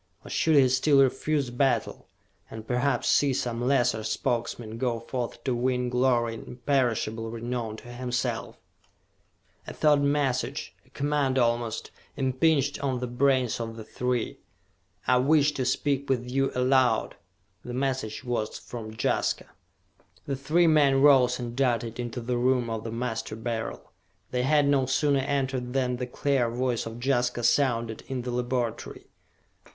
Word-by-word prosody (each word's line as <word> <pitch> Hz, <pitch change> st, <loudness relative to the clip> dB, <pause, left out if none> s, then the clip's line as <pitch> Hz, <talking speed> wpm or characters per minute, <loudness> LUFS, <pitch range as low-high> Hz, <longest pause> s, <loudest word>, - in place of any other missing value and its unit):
Or -, -, -9 dB
should 160 Hz, -1 st, +2 dB
he 135 Hz, -2 st, +6 dB
still 135 Hz, +2 st, +4 dB
refuse 135 Hz, 0 st, 0 dB
battle 135 Hz, +2 st, 0 dB, 0.4 s
and 110 Hz, -1 st, -8 dB
perhaps 125 Hz, +4 st, 0 dB
see 140 Hz, -2 st, +3 dB
some 120 Hz, -2 st, -2 dB
lesser 120 Hz, -4 st, +2 dB
Spokesman 115 Hz, 0 st, -2 dB
go 120 Hz, -2 st, 0 dB
forth 120 Hz, 0 st, -5 dB
to 130 Hz, -, 0 dB
win 125 Hz, 0 st, 0 dB
glory 125 Hz, -2 st, +2 dB
and 115 Hz, -, -9 dB
imperishable 120 Hz, -3 st, -1 dB
renown 115 Hz, -1 st, -4 dB
to 120 Hz, -, -13 dB
himself? 125 Hz, 0 st, -3 dB, 1.1 s
A -, -, -7 dB
thought 150 Hz, -2 st, +4 dB
message, 140 Hz, -3 st, 0 dB
a -, -, -24 dB
command 140 Hz, -2 st, 0 dB
almost, 120 Hz, -2 st, 0 dB, 0.3 s
impinged 140 Hz, +2 st, +1 dB
on 130 Hz, -3 st, -1 dB
the 125 Hz, -, -2 dB
brains 125 Hz, -1 st, +1 dB
of 115 Hz, -1 st, -5 dB
the 110 Hz, -, -7 dB
three. 125 Hz, +1 st, -2 dB, 0.7 s
"I 125 Hz, -, +4 dB
wish 145 Hz, +3 st, +4 dB
to 135 Hz, -3 st, -3 dB
speak 140 Hz, +2 st, 0 dB
with 125 Hz, -2 st, 0 dB
you 135 Hz, +2 st, 0 dB
aloud!" 130 Hz, 0 st, +2 dB, 0.5 s
The 125 Hz, -, -6 dB
message 130 Hz, -5 st, -2 dB
was 120 Hz, -3 st, -2 dB
from 110 Hz, -2 st, -8 dB
Jaska! -, -, 0 dB, 0.7 s
The 140 Hz, -, -2 dB
three 155 Hz, +6 st, +2 dB
men 145 Hz, -4 st, +4 dB
rose 130 Hz, -4 st, +6 dB
and 120 Hz, -1 st, -6 dB
darted 120 Hz, -3 st, 0 dB
into 120 Hz, 0 st, -4 dB
the 120 Hz, +1 st, -1 dB
room 125 Hz, -1 st, +1 dB
of 110 Hz, -1 st, -3 dB
the 115 Hz, -, -5 dB
Master 115 Hz, -2 st, -3 dB
Beryl. 115 Hz, 0 st, -5 dB, 0.4 s
They 125 Hz, -, 0 dB
had 145 Hz, +2 st, +3 dB
no 135 Hz, -2 st, +2 dB
sooner 140 Hz, +1 st, +2 dB
entered 130 Hz, -2 st, -2 dB
than 125 Hz, -2 st, 0 dB
the 125 Hz, 0 st, -4 dB
clear 130 Hz, -1 st, 0 dB
voice 120 Hz, -1 st, -1 dB
of 115 Hz, +1 st, -8 dB
Jaska 125 Hz, -2 st, +1 dB
sounded 115 Hz, -2 st, +1 dB
in 130 Hz, -2 st, -3 dB
the 125 Hz, -, -4 dB
laboratory. 120 Hz, -1 st, -3 dB
125 Hz, 150 wpm, -27 LUFS, 120-135 Hz, 1.1 s, he